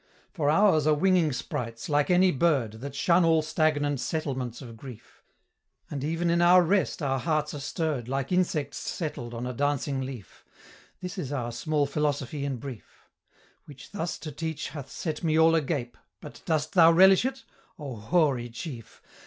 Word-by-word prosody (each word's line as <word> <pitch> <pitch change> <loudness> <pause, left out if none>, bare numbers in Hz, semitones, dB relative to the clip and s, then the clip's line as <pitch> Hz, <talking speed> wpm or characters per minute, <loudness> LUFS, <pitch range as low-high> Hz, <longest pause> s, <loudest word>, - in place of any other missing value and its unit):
"For 150 -6 0
ours 160 -2 +4
are 155 - +4
winging 175 -1 +3
sprites, 115 -2 -5
like 145 +1 +1
any 180 +1 +5
bird, 140 -7 +1
That 140 0 -6
shun 170 +4 +3
all 160 -1 +3
stagnant 150 -3 0
settlements 130 -6 -3
of 120 -4 -10
grief; 125 -1 -12 0.7
And 140 -2 -4
even 165 +3 0
in 170 0 +2
our 180 +1 +6
rest 185 -2 0
our 135 -1 0
hearts 155 0 -1
are 145 - -5
stirr'd, 145 -4 -3
Like 135 +2 -3
insects 165 -6 0
settled 120 -8 -5
on 120 +2 -4
a 125 - -4
dancing 140 0 -1
leaf: 130 -6 -8 0.6
This 180 +2 -6
is 145 -6 -4
our 120 -4 -3
small 150 +4 0
philosophy 145 -1 -2
in 140 -2 -2
brief, 125 -3 -10 0.6
Which 140 -2 -13
thus 175 -4 -3
to 155 - -6
teach 160 +1 -4
hath 140 -3 -8
set 155 -2 -5
me 160 -1 +2
all 160 0 +5
agape: 140 -6 -1 0.2
But - - -11
dost 155 -1 -1
thou 165 -3 +7
relish 190 +4 +6
it? 265 +1 -3 0.3
O 140 -6 -6
hoary 125 +1 +1
chief! 120 -1 -9
150 Hz, 170 wpm, -27 LUFS, 130-165 Hz, 0.7 s, thou